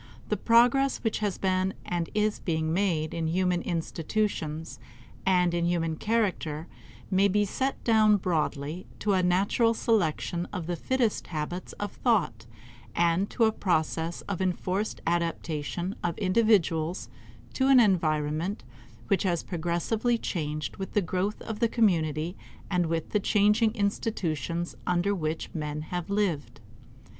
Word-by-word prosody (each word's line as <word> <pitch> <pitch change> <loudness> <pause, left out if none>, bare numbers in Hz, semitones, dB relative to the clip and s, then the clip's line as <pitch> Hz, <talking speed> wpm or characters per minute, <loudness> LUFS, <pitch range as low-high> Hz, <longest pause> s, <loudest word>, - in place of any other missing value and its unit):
The 210 - +2
progress 240 +6 +4
which 225 - 0
has 205 -3 -1
been 185 0 0
and 175 -2 -2
is 215 0 +1
being 160 -2 -1
made 170 -5 0
in 165 -1 -1
human 180 +1 +1
institutions 165 - -2 0.5
and 180 -2 +3
in 170 0 +1
human 165 -2 0
character 185 -7 -1 0.5
may 195 +1 +4
be 205 +1 +2
set 265 +7 -2
down, 215 -2 +5
broadly, 160 -2 -2
to 205 -1 0
a 185 - +3
natural 200 +6 +2
selection 175 -5 0
of 180 -5 -4
the 175 +1 -2
fittest 245 +3 0
habits 170 +3 -4
of 205 -1 -4
thought 130 - 0 0.5
and 170 +3 +2
to 235 - +1
a 220 - +5
process 165 -3 -1
of 195 -2 -4
enforced 185 +2 -1
adaptation 170 +1 -1
of 175 -1 -1
individuals 185 -5 +2 0.5
to 265 - +1
an 270 -2 +7
environment 165 -3 +1 0.4
which 195 -3 +2
has 175 -4 0
progressively 180 +8 0
changed 155 -7 -3
with 190 - -6
the 205 - +2
growth 185 +4 -1
of 220 -1 -5
the 230 - +2
community 170 -7 +1 0.4
and 180 -2 +2
with 165 0 -2
the 210 - +2
changing 210 +2 +3
institutions 175 -5 -2
under 180 +3 +2
which 160 -4 -3
men 150 -2 -3
have 175 +2 -5
lived. 200 -7 -1
180 Hz, 140 wpm, -28 LUFS, 165-210 Hz, 0.5 s, an